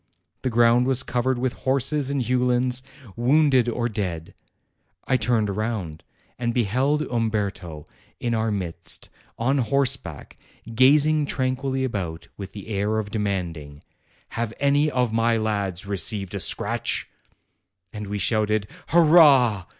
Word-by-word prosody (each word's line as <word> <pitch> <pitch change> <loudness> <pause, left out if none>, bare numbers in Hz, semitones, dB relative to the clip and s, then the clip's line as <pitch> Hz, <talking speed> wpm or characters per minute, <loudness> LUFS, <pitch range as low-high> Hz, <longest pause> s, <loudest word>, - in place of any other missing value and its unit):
The 130 - -1
ground 120 +1 +3
was 130 -1 +1
covered 125 +1 -1
with 125 0 -1
horses 135 +2 0
and 140 -2 -1
uhlans, 125 +1 +1 0.3
wounded 130 0 +3
or 120 0 -1
dead. 95 -8 -4 0.7
I 130 - +1
turned 110 -4 +1
round, 105 -8 -4 0.4
and 120 -1 -2
beheld 130 +7 +1
Umberto 100 - -3 0.3
in 120 -1 -2
our 110 0 0
midst, 95 -5 -4 0.3
on 135 +4 +1
horseback, 130 - -1 0.4
gazing 145 +4 +4
tranquilly 130 0 -1
about, 95 -10 -4
with 100 -1 -9
the 105 +1 -9
air 105 +1 -1
of 105 -2 -3
demanding, 85 -9 -4 0.5
'Have 115 -1 -3
any 145 +2 +2
of 125 -5 0
my 115 0 +2
lads 100 -5 -1
received 100 0 -2
a - - -3
scratch?' - - 0 0.9
And 105 -1 -6
we 105 +1 -3
shouted, 110 0 0 0.2
'Hurrah!' 145 - +5
115 Hz, 125 wpm, -23 LUFS, 100-130 Hz, 0.9 s, Hurrah